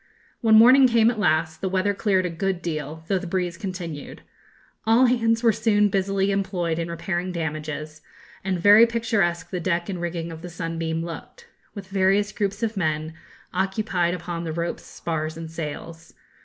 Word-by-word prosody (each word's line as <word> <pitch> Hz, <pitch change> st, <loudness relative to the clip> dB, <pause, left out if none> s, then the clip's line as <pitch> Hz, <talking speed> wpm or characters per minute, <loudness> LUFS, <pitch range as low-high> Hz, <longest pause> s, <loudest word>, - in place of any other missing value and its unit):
When 220 Hz, -2 st, +4 dB
morning 255 Hz, +4 st, +8 dB
came 230 Hz, -1 st, +4 dB
at 225 Hz, -, -6 dB
last, 160 Hz, -3 st, +1 dB
the 190 Hz, -, -1 dB
weather 190 Hz, +2 st, +1 dB
cleared 195 Hz, -2 st, +1 dB
a -, -, -1 dB
good 180 Hz, +1 st, -2 dB
deal, 155 Hz, -1 st, -4 dB
though 190 Hz, 0 st, +1 dB
the 180 Hz, -, -7 dB
breeze 180 Hz, -1 st, -1 dB
continued. 175 Hz, -5 st, -7 dB, 0.6 s
All 230 Hz, +4 st, +5 dB
hands 230 Hz, -2 st, +2 dB
were 230 Hz, -, +6 dB
soon 210 Hz, -2 st, +2 dB
busily 195 Hz, 0 st, 0 dB
employed 185 Hz, -4 st, -1 dB
in 165 Hz, 0 st, -3 dB
repairing 175 Hz, +2 st, -3 dB
damages; 155 Hz, -2 st, -5 dB, 0.4 s
and 185 Hz, -2 st, -1 dB
very 205 Hz, +5 st, +7 dB
picturesque 220 Hz, -7 st, 0 dB
the 180 Hz, -, -2 dB
deck 170 Hz, +1 st, -1 dB
and 180 Hz, -3 st, -4 dB
rigging 170 Hz, -1 st, -3 dB
of 160 Hz, 0 st, -9 dB
the 175 Hz, -, -7 dB
'Sunbeam' 165 Hz, -1 st, -3 dB
looked, 175 Hz, -, -9 dB, 0.3 s
with 200 Hz, -2 st, -8 dB
the -, -, -15 dB
various 195 Hz, +2 st, +2 dB
groups 200 Hz, +2 st, -2 dB
of 225 Hz, -1 st, -1 dB
men, 155 Hz, -3 st, -1 dB, 0.4 s
occupied 190 Hz, -2 st, 0 dB
upon 170 Hz, -1 st, -5 dB
the 165 Hz, -, -3 dB
ropes, 170 Hz, +1 st, -3 dB
spars, 160 Hz, -1 st, -4 dB
and 165 Hz, -1 st, -7 dB
sails. 165 Hz, +1 st, -7 dB
180 Hz, 175 wpm, -24 LUFS, 165-205 Hz, 0.6 s, morning